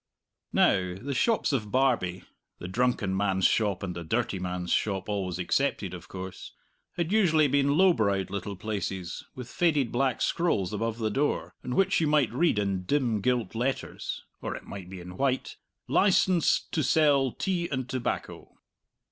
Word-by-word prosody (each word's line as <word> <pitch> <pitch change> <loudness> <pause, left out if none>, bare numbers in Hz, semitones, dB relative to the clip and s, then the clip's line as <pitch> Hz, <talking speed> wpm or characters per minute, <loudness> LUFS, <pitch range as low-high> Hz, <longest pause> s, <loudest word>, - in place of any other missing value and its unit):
Now, 90 -1 +2
the 135 +9 -5
shops 220 - +1
of 105 -6 -1
Barbie 120 -9 +1 0.3
(the 90 - -7
drunken 105 -2 0
man's 95 -1 +1
shop 100 -4 +2
and 90 -2 -4
the 85 - -5
dirty 105 +2 -1
man's 90 -1 -3
shop 95 -3 0
always 95 -4 -2
excepted, 90 - 0
of - - -9
course) 95 -1 -8 0.4
had 170 0 -2
usually 165 -8 +4
been 140 +1 +2
low 185 0 +6
browed 100 - 0
little 100 0 -4
places 95 -3 -4
with 125 -2 -7
faded 150 -4 +1
black 130 0 +1
scrolls 105 - 0
above 115 +2 -2
the 110 -2 -1
door, 145 +7 -1
on 125 - -3
which 195 -2 +3
you 160 - +2
might 150 -6 +2
read 155 -2 +2
in 100 -2 0
dim 120 -4 +1
gilt 120 -3 0
letters 125 +4 -3 0.2
(or - - -3
it - - -8
might 95 -3 -9
be 95 -1 -8
in 90 +1 -10
white) 135 -1 -1 0.3
"LICENS'D 185 -3 +3
TO 155 - 0
SELL 145 -5 +3
TEA 180 -3 -1
& 130 -4 -3
TOBACCO." 125 -1 -4
115 Hz, 165 wpm, -28 LUFS, 95-145 Hz, 0.4 s, low